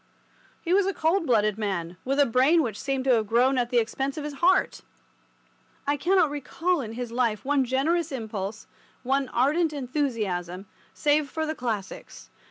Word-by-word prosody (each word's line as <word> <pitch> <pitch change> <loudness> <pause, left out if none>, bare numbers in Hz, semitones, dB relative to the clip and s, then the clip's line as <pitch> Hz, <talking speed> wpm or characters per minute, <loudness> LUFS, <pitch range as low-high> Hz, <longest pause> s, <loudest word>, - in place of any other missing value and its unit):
He 345 - 0
was 390 0 +3
a 395 - -1
cold 330 +2 +1
blooded 215 -3 +2
man, 180 -5 -3
with 275 +2 -1
a 285 - +6
brain 270 +8 +3
which 220 -5 -4
seemed 270 -1 -1
to 265 - +2
have 220 -3 +2
grown 250 +4 +3
at 240 -1 -1
the 245 - +1
expense 265 +5 -1
of 305 - -4
his 295 0 -5
heart. 370 +2 +3 1.0
I 285 - +1
cannot 340 +1 +2
recall 325 +4 -1
in 225 -3 -6
his 240 0 -5
life 235 -3 -1
one 280 -1 +2
generous 300 +6 0
impulse, 220 -4 -5 0.4
one 270 +1 0
ardent 305 +6 +1
enthusiasm, 220 - -3 0.3
save 295 -1 +1
for 315 +3 -2
the 310 - -2
Classics. 220 -9 -6
265 Hz, 175 wpm, -26 LUFS, 225-300 Hz, 1.0 s, a